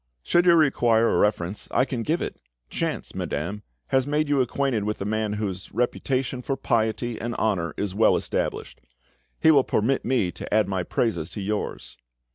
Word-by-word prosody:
"Should 175 Hz, -, +3 dB
you 170 Hz, -, +7 dB
require 120 Hz, -7 st, +3 dB
a -, -, +2 dB
reference, 100 Hz, -2 st, 0 dB
I 130 Hz, -, +2 dB
can 125 Hz, -3 st, -3 dB
give 160 Hz, +9 st, 0 dB
it. -, -, -4 dB, 0.4 s
Chance, -, -, -3 dB
madame, 90 Hz, +8 st, -3 dB, 0.3 s
has 130 Hz, 0 st, +2 dB
made 150 Hz, +1 st, 0 dB
you 140 Hz, -2 st, +3 dB
acquainted 130 Hz, -3 st, 0 dB
with 105 Hz, +1 st, -2 dB
a 100 Hz, -, -3 dB
man 110 Hz, 0 st, -1 dB
whose, 100 Hz, -3 st, -4 dB
reputation 130 Hz, +1 st, -1 dB
for 135 Hz, +2 st, -2 dB
piety 115 Hz, -1 st, -1 dB
and 120 Hz, 0 st, -3 dB
honour 90 Hz, -7 st, 0 dB
is 100 Hz, -2 st, -2 dB
well 110 Hz, +3 st, +4 dB
established; -, -, -3 dB, 0.6 s
he 160 Hz, -, +6 dB
will 140 Hz, -4 st, +5 dB
permit 130 Hz, +5 st, +1 dB
me 120 Hz, -8 st, +1 dB
to -, -, -9 dB
add 105 Hz, -2 st, +3 dB
my 95 Hz, -2 st, -1 dB
praises 90 Hz, -3 st, -1 dB
to 105 Hz, -, -7 dB
yours." 105 Hz, -, -4 dB
115 Hz, 180 wpm, -25 LUFS, 105-130 Hz, 0.6 s, you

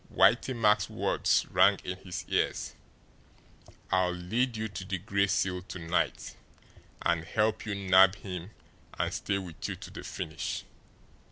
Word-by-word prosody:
Whitey 120 Hz, +5 st, +4 dB
Mack's 105 Hz, -3 st, +3 dB
words -, -, +1 dB
rang -, -, +5 dB
in 90 Hz, -, -3 dB
his 90 Hz, -1 st, -6 dB
ears: -, -, 0 dB, 1.2 s
"I'll 95 Hz, -1 st, +3 dB
LEAD 110 Hz, +8 st, -1 dB
you 110 Hz, 0 st, -2 dB
to 100 Hz, -2 st, -7 dB
the 95 Hz, 0 st, -3 dB
Gray 100 Hz, +1 st, +1 dB
Seal 90 Hz, -2 st, 0 dB
to 90 Hz, -, -8 dB
night 85 Hz, 0 st, -1 dB, 0.7 s
and 85 Hz, -1 st, +1 dB
help 110 Hz, +5 st, 0 dB
you 100 Hz, -, -1 dB
nab 95 Hz, 0 st, +6 dB
him 90 Hz, -2 st, -7 dB, 0.5 s
and -, -, -1 dB
stay 100 Hz, -, -1 dB
with 90 Hz, -4 st, -6 dB
you -, -, -3 dB
to -, -, -10 dB
the -, -, -8 dB
finish." 80 Hz, 0 st, -4 dB
95 Hz, 150 wpm, -30 LUFS, 90-105 Hz, 1.2 s, nab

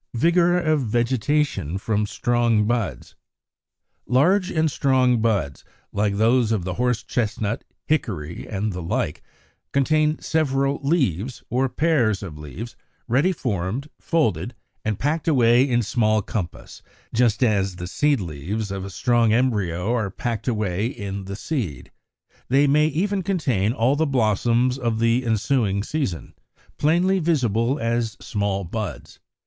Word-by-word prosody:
53. 125 Hz, +8 st, +3 dB
=Vigor 175 Hz, 0 st, +3 dB
of 155 Hz, -4 st, +1 dB
Vegetation 120 Hz, -, 0 dB
from 105 Hz, +1 st, -1 dB
strong 120 Hz, -1 st, +1 dB
buds.= 105 Hz, -, -2 dB, 0.9 s
Large 180 Hz, +10 st, +3 dB
and 160 Hz, -3 st, +1 dB
strong 130 Hz, -4 st, +2 dB
buds, 100 Hz, -12 st, 0 dB, 0.3 s
like 100 Hz, 0 st, 0 dB
those 115 Hz, +1 st, +3 dB
of 105 Hz, -5 st, 0 dB
the 90 Hz, 0 st, -3 dB
Horse 125 Hz, +2 st, 0 dB
chestnut, 110 Hz, -2 st, -2 dB, 0.2 s
Hickory, 90 Hz, -, -2 dB
and 105 Hz, 0 st, -2 dB
the 90 Hz, -, -5 dB
like, 80 Hz, -, -2 dB, 0.5 s
contain 155 Hz, +2 st, +2 dB
several 140 Hz, -3 st, 0 dB
leaves, 130 Hz, -, 0 dB
or 130 Hz, +2 st, +1 dB
pairs 120 Hz, -, +1 dB
of 85 Hz, -6 st, -7 dB
leaves, 75 Hz, -, -8 dB, 0.3 s
ready 140 Hz, +10 st, +3 dB
formed, 120 Hz, -, -3 dB
folded 120 Hz, -, 0 dB, 0.3 s
and 110 Hz, -2 st, -1 dB
packed 150 Hz, +3 st, -1 dB
away 125 Hz, -2 st, +4 dB
in 120 Hz, -1 st, +2 dB
small 110 Hz, 0 st, +1 dB
compass, 90 Hz, -5 st, -5 dB, 0.3 s
just 115 Hz, 0 st, +2 dB
as 100 Hz, -5 st, +1 dB
the 90 Hz, 0 st, -6 dB
seed 145 Hz, +8 st, +1 dB
leaves 95 Hz, +5 st, -4 dB
of 95 Hz, -1 st, -4 dB
a 100 Hz, -, -6 dB
strong 115 Hz, +4 st, +2 dB
embryo 105 Hz, -5 st, +1 dB
are 110 Hz, -5 st, 0 dB
packed 115 Hz, +4 st, -4 dB
away 105 Hz, -3 st, 0 dB
in 100 Hz, -5 st, -5 dB
the 100 Hz, +1 st, -5 dB
seed: 100 Hz, -, -4 dB, 0.6 s
they 135 Hz, +3 st, +4 dB
may 150 Hz, +2 st, +4 dB
even 190 Hz, +6 st, 0 dB
contain 135 Hz, -, 0 dB
all 125 Hz, +3 st, +2 dB
the 160 Hz, +2 st, +1 dB
blossoms 120 Hz, +1 st, +1 dB
of 115 Hz, -3 st, -1 dB
the 115 Hz, +2 st, +2 dB
ensuing 110 Hz, -3 st, +1 dB
season, 110 Hz, -, -3 dB, 0.5 s
plainly 175 Hz, +5 st, +3 dB
visible 130 Hz, -, +1 dB
as 115 Hz, -3 st, -1 dB
small 100 Hz, -1 st, -2 dB
buds. 95 Hz, -2 st, -6 dB
115 Hz, 140 wpm, -23 LUFS, 100-140 Hz, 0.9 s, away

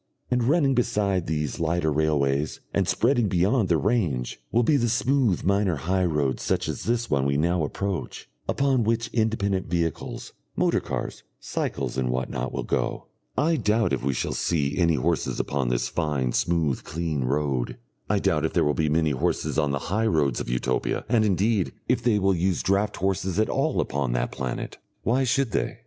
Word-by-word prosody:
And 125 Hz, -1 st, +2 dB
running 140 Hz, 0 st, +3 dB
beside 105 Hz, -7 st, 0 dB
these 75 Hz, -2 st, -2 dB
lighter 85 Hz, -1 st, +1 dB
railways, 75 Hz, -1 st, +1 dB
and -, -, +1 dB
spreading 120 Hz, -2 st, +2 dB
beyond 95 Hz, +4 st, +2 dB
their 85 Hz, -, +4 dB
range, 85 Hz, -, -1 dB
will 120 Hz, +2 st, +3 dB
be 150 Hz, -, +3 dB
the 120 Hz, -4 st, +2 dB
smooth 120 Hz, -4 st, +1 dB
minor 100 Hz, -1 st, +2 dB
high 90 Hz, +6 st, 0 dB
roads 75 Hz, -6 st, 0 dB
such -, -, 0 dB
as -, -, -4 dB
this 120 Hz, 0 st, 0 dB
one 70 Hz, -2 st, +2 dB
we 70 Hz, +1 st, +1 dB
now 85 Hz, +2 st, +1 dB
approach, 95 Hz, +5 st, -4 dB, 0.2 s
upon 135 Hz, -3 st, +2 dB
which 115 Hz, +1 st, 0 dB
independent 100 Hz, -4 st, 0 dB
vehicles, 85 Hz, -1 st, -3 dB, 0.2 s
motor -, -, +2 dB
cars, -, -, -5 dB, 0.2 s
cycles, 65 Hz, -, -3 dB
and 65 Hz, -1 st, 0 dB
what 65 Hz, 0 st, -2 dB
not, 65 Hz, +1 st, -3 dB
will -, -, -3 dB
go. -, -, -2 dB, 0.3 s
I 160 Hz, +4 st, +2 dB
doubt 110 Hz, -4 st, +1 dB
if -, -, -1 dB
we 70 Hz, 0 st, +1 dB
shall -, -, -2 dB
see 70 Hz, -4 st, 0 dB
any 85 Hz, -3 st, +3 dB
horses 65 Hz, -, 0 dB
upon 70 Hz, -3 st, -1 dB
this -, -, 0 dB
fine, 70 Hz, -4 st, -1 dB
smooth, 80 Hz, -5 st, 0 dB
clean 80 Hz, -4 st, -2 dB
road; 70 Hz, -2 st, -1 dB, 0.3 s
I -, -, +3 dB
doubt -, -, +1 dB
if -, -, -1 dB
there -, -, +3 dB
will 75 Hz, -, +2 dB
be 80 Hz, 0 st, 0 dB
many 80 Hz, 0 st, +2 dB
horses 65 Hz, +3 st, 0 dB
on 75 Hz, -2 st, +1 dB
the 70 Hz, -, 0 dB, 0.2 s
high 110 Hz, +2 st, +2 dB
roads 75 Hz, -, +1 dB
of -, -, -4 dB
Utopia, 60 Hz, +1 st, -1 dB
and, 115 Hz, -2 st, +3 dB
indeed, 100 Hz, 0 st, +1 dB
if -, -, +2 dB
they 115 Hz, -3 st, +2 dB
will 95 Hz, -1 st, +2 dB
use 90 Hz, 0 st, 0 dB
draught 100 Hz, +2 st, +1 dB
horses 95 Hz, -1 st, -1 dB
at 110 Hz, -, +2 dB
all 140 Hz, +4 st, 0 dB
upon 70 Hz, -3 st, -1 dB
that -, -, -1 dB
planet. 65 Hz, -2 st, -5 dB, 0.2 s
Why 130 Hz, +3 st, +2 dB
should 130 Hz, -1 st, +1 dB
they? -, -, -1 dB
90 Hz, 190 wpm, -25 LUFS, 70-110 Hz, 0.3 s, their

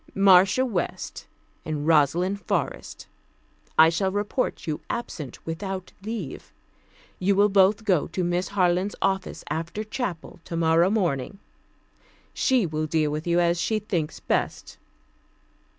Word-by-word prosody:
Marcia 195 Hz, +5 st, +5 dB
West 195 Hz, -9 st, -4 dB, 0.4 s
and 150 Hz, -2 st, -3 dB
Rosalind 165 Hz, +6 st, +2 dB
Forrest, -, -, -3 dB, 0.7 s
I 160 Hz, +1 st, +8 dB
shall 190 Hz, +3 st, 0 dB
report 205 Hz, +5 st, -2 dB
you 155 Hz, -2 st, -3 dB
absent 155 Hz, -, -5 dB
without 185 Hz, +3 st, -5 dB
leave. 205 Hz, -, -6 dB, 0.7 s
You 195 Hz, +2 st, +2 dB
will 205 Hz, +1 st, +4 dB
both 200 Hz, +2 st, +4 dB
go 185 Hz, -8 st, +2 dB
to 185 Hz, -, -3 dB
Miss 175 Hz, +1 st, 0 dB
Harland's 185 Hz, 0 st, +1 dB
office 190 Hz, -1 st, -1 dB
after 165 Hz, +6 st, -3 dB
chapel 210 Hz, -7 st, -5 dB
tomorrow 165 Hz, +1 st, +2 dB
morning. 185 Hz, -, -1 dB, 1.0 s
She 255 Hz, -6 st, +2 dB
will 155 Hz, -1 st, -2 dB
deal 155 Hz, -1 st, +1 dB
with 155 Hz, +3 st, -4 dB
you 170 Hz, 0 st, +3 dB
as 170 Hz, 0 st, +2 dB
she 220 Hz, +5 st, 0 dB
thinks 180 Hz, -8 st, -3 dB
best. -, -, -2 dB
180 Hz, 125 wpm, -25 LUFS, 165-200 Hz, 1.0 s, I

